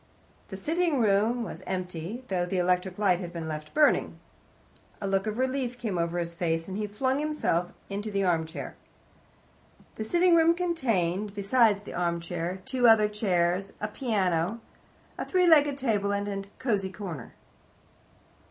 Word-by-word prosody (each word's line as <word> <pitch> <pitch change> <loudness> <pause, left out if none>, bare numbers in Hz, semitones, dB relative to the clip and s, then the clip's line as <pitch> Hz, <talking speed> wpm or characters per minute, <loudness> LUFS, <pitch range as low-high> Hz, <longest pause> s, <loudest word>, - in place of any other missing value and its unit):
The 190 - -7
sitting 325 - 0
room 220 +3 +2
was 185 -5 -7
empty, 185 +4 -4
though 180 -2 -1
the 185 - -2
electric 180 +1 +1
light 190 -4 +3
had 175 -2 -6
been 165 -2 -5
left 155 -1 -6
burning. 300 0 +3 0.8
A 200 - -3
look 195 +1 0
of 215 +1 -2
relief 255 -1 -1
came 215 -7 -2
over 170 +1 -1
his 170 -1 -2
face, 165 -1 -1
and 190 - -5
he 210 +1 -2
flung 260 +6 0
himself 295 - 0 0.2
into 205 +2 -4
the 200 -1 0
armchair. 165 -3 -1 1.2
The 220 - -2
sitting 345 +9 +4
room 330 0 +5
contained, 215 - -1
besides 205 0 +3
the - - -8
armchair, 170 +1 -2
two 260 -2 +2
other 220 -2 +6
chairs, 195 -2 0
a 210 - -2
piano, 205 -4 0 0.6
a - - -1
three 365 -1 +2
legged 295 -4 +5
table, 210 -7 0
and 200 0 -1
a 195 -1 -4
cosy 205 -7 -1
corner. 180 - -7
200 Hz, 155 wpm, -28 LUFS, 180-245 Hz, 1.2 s, other